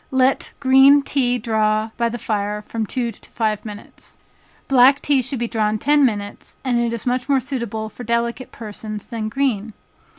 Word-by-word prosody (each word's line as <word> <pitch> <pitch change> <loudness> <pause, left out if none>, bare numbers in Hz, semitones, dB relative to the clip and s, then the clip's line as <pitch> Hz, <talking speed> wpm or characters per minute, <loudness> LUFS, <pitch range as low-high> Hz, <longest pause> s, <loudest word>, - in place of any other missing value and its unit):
Let 260 0 +1
green 270 +1 +6
tea 250 -3 0
draw 220 -1 0
by 235 0 0
the 240 - -4
fire 210 -1 -2
from 220 0 -4
two 240 -1 -2
to - - -17
five 215 -2 -1
minutes. 210 -1 -11 0.5
Black 270 +1 +6
tea 280 -3 +2
should 245 -2 -2
draw 215 -2 +1
ten 290 +7 +3
minutes, 205 -5 -2
and 235 -3 +1
is 230 -2 -5
much 250 +2 -1
more 275 -1 +4
suitable 235 -5 -4
for 230 +3 -10
delicate 235 +2 -2
persons 215 -1 -7
than 220 -2 -3
green. 230 -4 -1
235 Hz, 165 wpm, -20 LUFS, 215-260 Hz, 0.5 s, green